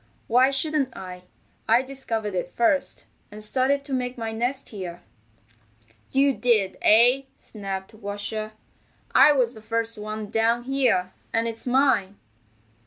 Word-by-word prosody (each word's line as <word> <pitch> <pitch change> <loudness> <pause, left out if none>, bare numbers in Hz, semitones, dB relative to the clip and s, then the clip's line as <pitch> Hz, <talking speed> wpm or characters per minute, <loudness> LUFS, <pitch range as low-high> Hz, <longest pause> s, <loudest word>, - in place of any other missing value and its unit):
Why 255 +3 +4
shouldn't 275 -1 -1
I? 180 -1 -9 0.4
I 235 +3 +5
discovered 230 -6 -4
it 180 -1 -2
first, 280 +5 +1 0.3
and 210 +1 -6
started 265 +5 +1
to 280 - -6
make 250 -1 -2
my 225 -1 -3
nest 245 +5 -3
here." 175 -4 -7 1.1
"You 275 +1 +3
did, 220 -7 +1
eh?" 245 +5 +5
snapped 195 -1 -7
Washer. 215 +1 -4 0.6
"I 280 +3 +8
was 250 -4 +1
the 220 - -12
first 230 0 -2
one 215 0 -5
down 230 +1 +2
here, 245 -9 +1 0.2
and 230 0 +1
it's 230 +2 -3
mine." 245 -7 +2
230 Hz, 135 wpm, -25 LUFS, 210-260 Hz, 1.1 s, I